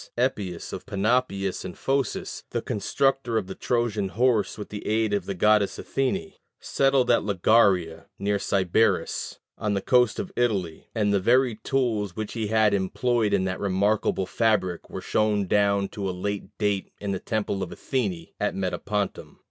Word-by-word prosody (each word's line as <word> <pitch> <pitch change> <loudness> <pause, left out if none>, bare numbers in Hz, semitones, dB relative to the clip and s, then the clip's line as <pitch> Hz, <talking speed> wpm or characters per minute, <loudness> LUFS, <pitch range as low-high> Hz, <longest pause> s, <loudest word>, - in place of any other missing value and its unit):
Epius, 105 -9 -2
of - - -7
Panopeus 100 -2 0
in 90 - -7
Phocis, 135 0 -2
the - - -2
constructor 130 +3 0
of 105 - 0
the 95 - -6
Trojan 110 -5 -1
horse 115 0 +1
with 105 - -7
the 105 - -6
aid 110 0 +1
of 100 - -1
the 100 - -3
goddess 105 +2 +3
Athene, 190 +9 -2 0.3
settled 135 -2 +2
at 120 - +4
Lagaria, 95 -5 +2
near 100 0 0
Sybaris, 100 +3 +1 0.2
on 105 -1 0
the - - +1
coast 125 +1 +3
of 195 -2 -4
Italy; 100 -10 -1
and 105 -2 +2
the 100 - +3
very 125 +5 +3
tools 110 -4 -1
which 110 -1 -4
he 110 -2 -2
had 110 -1 +3
employed 110 +3 +1
in 100 -2 +2
that 95 0 -2
remarkable 100 0 +1
fabric 105 -5 0
were - - -6
shown 105 -2 +1
down 100 0 +2
to 100 -2 -4
a 90 -1 -5
late 100 +1 -2
date 105 -2 -1
in 100 -1 -3
the 95 - -2
temple 105 -2 -2
of 95 - -4
Athene 100 -11 -3
at 105 - 0
Metapontum. 100 +2 -3
105 Hz, 165 wpm, -25 LUFS, 95-115 Hz, 0.3 s, at